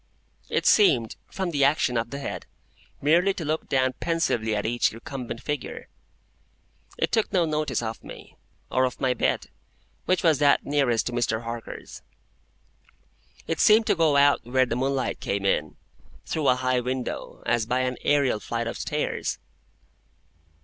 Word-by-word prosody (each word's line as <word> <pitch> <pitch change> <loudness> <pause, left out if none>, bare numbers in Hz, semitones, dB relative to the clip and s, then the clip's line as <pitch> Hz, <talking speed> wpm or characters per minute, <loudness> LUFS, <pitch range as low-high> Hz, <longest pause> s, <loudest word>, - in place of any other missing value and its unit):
It - - 0
seemed, 125 - +4
from 190 -2 -3
the 145 -3 +1
action 140 -3 +2
of 115 0 -1
the 140 - -5
head, 100 -10 -6 0.6
merely 175 +6 +3
to 165 - -5
look 155 +2 -2
down 130 -1 +2
pensively 120 -10 0
at 105 - -2
each 120 +2 +1
recumbent 120 0 -7
figure. 150 -1 -5 1.1
It - - 0
took 220 -2 +1
no 180 -3 +3
notice 155 -5 -1
of 110 0 -5
me, - - -12 0.4
or 130 - +2
of 125 - -4
my 130 -2 +2
bed, 125 - -1 0.5
which 185 +1 +1
was 160 -5 +4
that 145 -1 +4
nearest 135 -5 +1
to - - -2
Mr. 120 -2 -1
Harker's. 115 0 -7 1.4
It 165 - -2
seemed 220 +1 +6
to - - +2
go 160 -4 +3
out 140 0 +4
where 130 +2 +2
the 120 - -3
moonlight 135 +1 -1
came 100 0 -2
in, 75 -5 0 0.5
through 155 -3 -1
a 125 - +5
high 130 0 +1
window, 125 0 -4
as 115 -2 +1
by 125 +1 +1
an 125 -1 -1
aërial 140 -7 +2
flight 115 0 -3
of 115 - -5
stairs. - - -2
130 Hz, 160 wpm, -25 LUFS, 120-150 Hz, 1.4 s, seemed